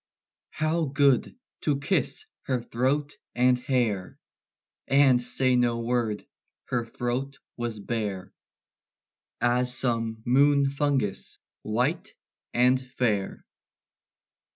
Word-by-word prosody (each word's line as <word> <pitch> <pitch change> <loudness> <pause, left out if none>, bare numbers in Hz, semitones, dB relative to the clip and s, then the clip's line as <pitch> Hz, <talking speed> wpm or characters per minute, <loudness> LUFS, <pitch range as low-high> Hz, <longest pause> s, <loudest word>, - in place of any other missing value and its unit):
How 155 +1 0
good 140 - +2 0.2
to 145 -3 +1
kiss 185 - -1 0.2
her 130 -2 +1
throat 130 +5 -1 0.2
and 125 0 +3
hair, 120 -8 -1 0.7
And 135 -2 +5
say 125 +1 +2
no 120 -1 +2
word! 115 -3 -1 0.4
Her 120 -2 -1
throat 125 +4 -3 0.2
was 120 -2 -3
bare; 100 -3 -4 1.1
As 125 +1 +1
some 115 -3 -1
moon 140 +2 +4
fungus 140 -8 -1 0.2
white 125 +9 -1 0.4
and 125 +1 +3
fair. 120 -6 -2
125 Hz, 95 wpm, -27 LUFS, 115-140 Hz, 1.1 s, And